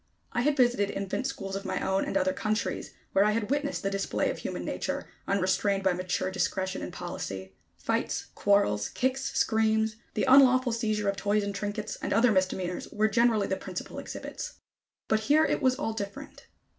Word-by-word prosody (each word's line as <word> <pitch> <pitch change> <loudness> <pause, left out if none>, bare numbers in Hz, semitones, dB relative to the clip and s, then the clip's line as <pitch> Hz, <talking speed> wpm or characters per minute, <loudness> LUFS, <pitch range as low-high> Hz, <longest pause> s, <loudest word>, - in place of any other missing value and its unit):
I 240 - 0
had 290 +3 +2
visited 240 -5 +3
infant 200 +7 -2
schools 195 -8 -5
of 195 - -4
my 190 - -2
own 190 0 +1
and - - 0
other 185 0 +2
countries, 215 +2 -2 0.2
where 195 - +5
I 210 +1 +3
had 225 +2 -1
witnessed 285 0 -1
the 195 - 0
display 195 0 0
of - - -7
human - - -4
nature, - - -3 0.2
unrestrained 195 +1 +1
by 190 -1 +3
mature 185 +1 -1
discretion 190 0 -1
and - - -5
policy. 95 - -6 0.2
Fights, - - -1
quarrels, 105 - +2
kicks, 260 +1 -1
screams, 220 -1 +2 0.2
the - - +1
unlawful 255 -1 +6
seizure 215 -3 0
of 200 0 0
toys 205 +1 +1
and 200 0 -3
trinkets, 205 +1 -4
and - - -1
other 230 +3 +5
misdemeanors, 185 -2 -1
were 215 +1 +2
generally 230 -3 +3
the 190 - -1
principal 185 -1 -6
exhibits. - - -6 0.5
But 220 - +3
here 295 +8 +4
it - - 0
was 260 -2 +3
all 260 -5 -2
different. 220 +7 -7
205 Hz, 180 wpm, -28 LUFS, 190-235 Hz, 0.5 s, unlawful